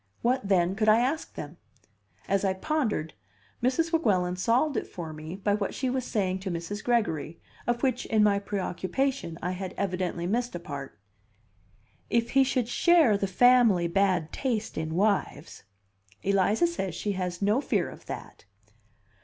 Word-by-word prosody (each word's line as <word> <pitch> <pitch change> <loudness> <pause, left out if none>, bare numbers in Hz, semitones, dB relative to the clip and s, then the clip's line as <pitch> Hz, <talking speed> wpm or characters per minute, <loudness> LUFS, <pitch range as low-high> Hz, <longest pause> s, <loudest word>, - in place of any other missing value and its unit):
What, 245 -3 +1
then, 180 -2 +3
could 215 +1 +2
I 215 - +7
ask 270 +6 -1
them? - - -7 0.7
As 195 0 +1
I 190 -1 +2
pondered, 215 - -1 0.5
Mrs. 295 +7 +1
Weguelin 185 - +2
solved 240 +10 +1
it - - -2
for 165 -3 -7
me 155 +3 -7
by 200 +1 0
what 205 -1 -2
she 260 -2 -1
was 260 -1 -2
saying 190 -3 -1
to 190 0 -5
Mrs. 175 +4 -4
Gregory, 170 -10 0 0.3
of 240 +1 0
which, 255 -2 0
in 215 -1 +3
my 200 -1 +3
preoccupation, 200 +2 -2
I 180 - -1
had 185 0 -5
evidently 180 -3 -2
missed 235 +3 -1
a - - -3
part: 140 -5 -7 0.6
" 100 +4 -36
if 230 +1 -5
he 270 0 +5
should 255 -3 0
share 315 - +4
the 200 0 -1
family 225 -4 +5
bad 180 -2 +1
taste 230 -5 -2
in 160 0 -3
wives." 195 - -1 0.6
"Eliza 200 - +3
says 335 - -2
she 210 - -2
has 180 -2 -3
no 210 +7 +3
fear - - 0
of - - -12
that." - - -8
200 Hz, 165 wpm, -27 LUFS, 180-245 Hz, 0.7 s, I